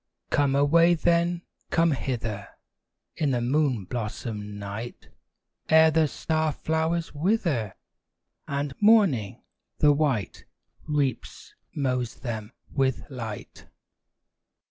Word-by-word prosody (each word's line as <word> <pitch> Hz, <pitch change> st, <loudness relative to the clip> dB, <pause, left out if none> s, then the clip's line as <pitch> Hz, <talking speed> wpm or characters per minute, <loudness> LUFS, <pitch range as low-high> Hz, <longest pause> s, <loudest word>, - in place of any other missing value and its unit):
Come 140 Hz, -1 st, +2 dB
away 165 Hz, +5 st, +5 dB
then, 170 Hz, +1 st, +1 dB, 0.3 s
come 165 Hz, 0 st, +3 dB
hither, 115 Hz, -7 st, -3 dB, 0.7 s
In 150 Hz, -, +1 dB
the 125 Hz, -2 st, +1 dB
moon 125 Hz, -3 st, +1 dB
blossomed 105 Hz, -1 st, -5 dB
night! 105 Hz, +4 st, -7 dB, 0.6 s
Ere 160 Hz, 0 st, +7 dB
the 160 Hz, 0 st, +3 dB
star 155 Hz, +1 st, -1 dB
flowers 160 Hz, +2 st, -1 dB
wither, 150 Hz, -, 0 dB, 0.7 s
And 140 Hz, 0 st, -2 dB
Morning, 195 Hz, -, +4 dB, 0.3 s
the 150 Hz, -1 st, +5 dB
white, 140 Hz, -9 st, -1 dB, 0.4 s
Reaps, 145 Hz, -5 st, -2 dB, 0.2 s
mows 125 Hz, -5 st, -1 dB
them 110 Hz, -4 st, -5 dB, 0.2 s
with 135 Hz, -2 st, +1 dB
light. 115 Hz, -5 st, -7 dB
140 Hz, 100 wpm, -26 LUFS, 120-160 Hz, 0.7 s, Ere